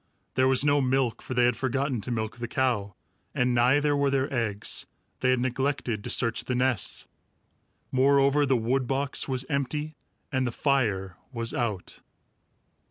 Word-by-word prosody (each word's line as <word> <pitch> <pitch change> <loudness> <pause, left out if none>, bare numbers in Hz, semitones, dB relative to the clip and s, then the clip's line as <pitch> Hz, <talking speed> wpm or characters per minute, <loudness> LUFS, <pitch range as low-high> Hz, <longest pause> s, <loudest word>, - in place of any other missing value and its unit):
There 130 0 +3
was 130 +1 +4
no 145 0 +4
milk, 130 -3 0
for 130 - -6
they 120 0 +4
had 120 -1 +2
forgotten 135 -1 -1
to 105 - -5
milk 110 -1 -3
the 120 0 -4
cow, 115 -7 -1 0.4
and 125 -2 +2
neither 140 +5 +3
were 140 -1 +2
there 135 0 0
eggs. 110 -4 -1 0.3
They 130 - +1
had 130 -1 +3
neglected 130 -3 -1
to - - -5
search 115 -1 +1
the 125 - -1
nests. 125 -4 0 0.9
Moreover, 140 +2 +4
the 130 -1 +3
wood 125 +3 0
box 135 +1 0
was 130 -1 -1
empty, 150 +1 -2 0.3
and 130 -2 0
the - - -2
fire 105 - 0
was 115 -2 -2
out. 110 -6 -3
130 Hz, 165 wpm, -27 LUFS, 120-135 Hz, 0.9 s, was